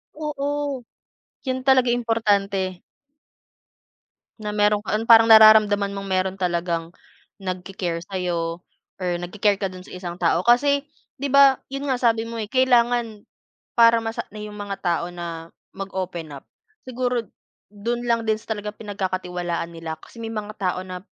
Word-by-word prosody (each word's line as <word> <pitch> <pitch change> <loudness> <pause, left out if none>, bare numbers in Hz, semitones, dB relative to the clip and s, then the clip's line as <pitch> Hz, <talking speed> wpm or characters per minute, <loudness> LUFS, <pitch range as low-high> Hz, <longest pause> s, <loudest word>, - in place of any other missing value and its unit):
Oo, 290 -3 -3 0.6
'yun 260 0 -2
talaga 260 -2 +4
importante 200 -6 0 1.6
na 210 -1 -4
mayro'n 210 0 +2
ka - - -2
ang 225 +2 -1
parang 225 0 +9
nararamdaman 215 -2 +7
mong 195 0 -6
mayro'n 190 0 0
talagang 170 -2 -2 0.5
nag-ki-care 180 -2 -4
sa'yo 175 -3 -3 0.4
or 180 - -1
nag-ki-care 200 +2 +1
ka 200 - -2
do'n 185 0 -10
sa - - -13
isang 175 -1 -6
tao 170 +1 +2
kasi, 280 +4 +4 0.3
'di 280 +1 -3
ba 275 -1 +7 0.2
'yun 275 +1 -3
nga 260 - +1
sabi 230 -2 +2
mo, 230 0 -6
eh, 215 - -2
kailangan 240 -4 +2 0.5
para 230 -1 +6
masa 225 0 -4
na 215 - -12
'yung 210 0 -7
mga 200 -1 -5
tao 170 -1 0
na 170 -1 -7 0.2
mag 195 0 -6
open 175 -5 -4
up - - -15 0.4
siguro 250 -2 -1 0.5
do'n 235 +4 -3
lang 230 -1 +1
din 220 0 +1
sa 220 0 -4
talagang 210 0 -7
pinagkakatiwalaan 180 -4 -3
nila 165 -1 -6
kasi - - -16
may 225 - -4
mga 215 -1 -5
tao 185 -2 -1
na, 180 -1 -7
210 Hz, 155 wpm, -23 LUFS, 180-235 Hz, 1.6 s, parang